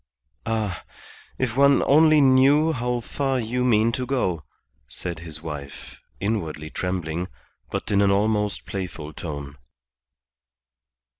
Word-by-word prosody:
"Ah, 110 -5 -2 0.5
if 125 -3 -1
one 140 +1 +5
only 155 +1 +6
knew 140 +4 +5
how 125 -3 -1
far 135 +2 -1
you 120 +2 -1
mean 115 -2 +3
to 125 +2 -3
go," 95 - -1 0.4
said 85 +6 -6
his 80 -1 -8
wife 75 -3 -8 0.2
inwardly 85 -7 -3
trembling, 90 -1 -3 0.4
but - - -4
in 100 0 +4
an 100 - +4
almost 105 0 +1
playful 85 -6 -6
tone. 70 -3 -7
105 Hz, 120 wpm, -24 LUFS, 85-130 Hz, 0.5 s, only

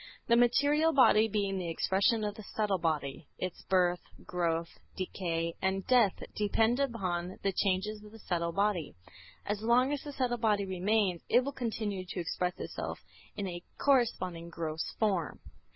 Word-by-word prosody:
The 235 - +5
material 285 +7 +4
body 225 -5 +6
being 200 -2 -1
the 175 -2 -3
expression 200 +7 +2
of 210 -1 -1
the 215 - -10
subtle 205 -3 +1
body, 150 -2 -2
its 185 -1 -4
birth, 180 -2 +3 0.3
growth, 170 -1 -2 0.2
decay 170 -3 -2
and 190 0 0
death 240 -7 +3
depend 220 +4 +2
upon 185 -9 -2
the 195 - +2
changes 200 +3 -1
of 210 - -13
the 225 - -12
subtle 170 -5 -2
body. 195 - 0 0.5
As 205 0 -2
long 245 +5 +3
as 285 - -2
the 290 - -7
subtle 250 -3 -1
body 210 -3 +2
remains, 190 -1 +1
it 245 - +5
will 280 - -3
continue 220 -7 -3
to 185 0 -6
express 180 +1 -1
itself - - -5 0.4
in 200 - -3
a 175 -1 -5 0.2
corresponding 185 -11 +1
gross 160 -1 -3
form. 200 -6 0
200 Hz, 160 wpm, -31 LUFS, 175-225 Hz, 0.5 s, body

